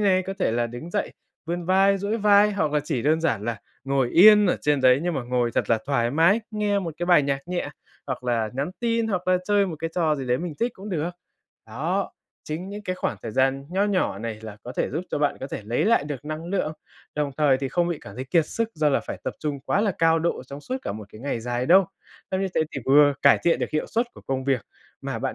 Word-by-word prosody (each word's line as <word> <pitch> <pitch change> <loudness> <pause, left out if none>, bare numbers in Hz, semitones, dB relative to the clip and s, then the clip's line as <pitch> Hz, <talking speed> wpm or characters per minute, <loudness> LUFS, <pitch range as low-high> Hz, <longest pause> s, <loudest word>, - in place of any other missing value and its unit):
này, 190 -2 +3
có 195 +1 -5
thể 185 - +1
là 120 0 +1
đứng 120 +8 -8
dậy 205 +2 -2 0.3
vươn 175 +1 -3
vai, 195 +2 +4
duỗi 200 +3 -1
vai 210 -1 +5
hoặc 155 -7 0
là 150 - +2
chỉ 135 -4 -3
đơn 155 +3 +2
giản 115 -11 0
là 115 -2 -3 0.2
ngồi 135 -2 +1
yên 210 +3 +8
ở 180 - +2
trên 145 -2 +1
đấy 130 +1 +5
nhưng 175 -1 -1
mà 135 - -2
ngồi 120 -1 0
thật - - 0
là 115 - +4
thoải 120 -4 +1
mái, 165 - +4
nghe 210 -2 0
một 170 -5 -4
cái 175 - -3
bài 175 -4 +6
nhạc 140 +2 -2
nhẹ 180 -1 -2 0.4
hoặc 125 - -4
là 115 -3 0
nhắn 140 +6 -2
tin, 230 -1 +1
hoặc 185 -3 -2
là 185 - +5
chơi 205 0 +3
một 170 -4 -5
cái 165 +1 -3
trò 160 -4 +2
gì 135 -3 -5
đấy 125 0 +1
mình 170 -2 -5
thích 235 +2 +1
cũng 195 +2 -9
được. 170 -3 -2 0.6
Đó, 160 - -2 0.3
chính 165 +5 -5
những 205 +1 -7
cái 185 -2 -3
khoảng - - -2
thời 115 - -5
gian 135 +3 +1
nho 190 +3 +1
nhỏ 190 - 0
này 110 0 -5
là 110 -2 -8
có 125 - -7
thể - - 0
giúp 160 +7 -3
cho - - -1
bạn 145 -1 +1
có 135 - -4
thể 125 - -6
lấy 115 +3 0
lại 225 -7 +3
được 145 -2 -6
năng 155 +1 -5
lượng, 175 -3 -1 0.4
đồng 150 -1 -1
thời 145 -4 +3
thì 135 0 -3
không 175 +4 +1
bị 170 -3 -2
cảm 100 - -11
thấy 130 +3 -5
kiệt 160 +2 +2
sức 230 +5 -2
do 155 -1 +2
là 140 - +2
phải - - -7
tập - - -3
trung 145 -2 -3
quá 180 - 0
là 210 -2 +1
cao 165 0 +4
độ 165 -4 -1
trong 140 +2 -9
suốt 255 - -4
cả - - -3
một 105 0 -8
cái 110 - -12
ngày 135 -3 -3
dài 120 +1 -2
đâu. 190 +3 +6 0.5
Xong 190 - 0
như 195 - 0
thế - - +2
thì 135 - -4
vừa 145 +1 +6
cải 140 - +6
thiện 170 - +3
được - - -3
hiệu 155 - -1
suất 235 +3 0
của - - -13
công 130 -1 -2
việc 135 -3 +1 0.4
mà - - -4
bạn - - -3
155 Hz, 270 wpm, -24 LUFS, 130-190 Hz, 0.6 s, yên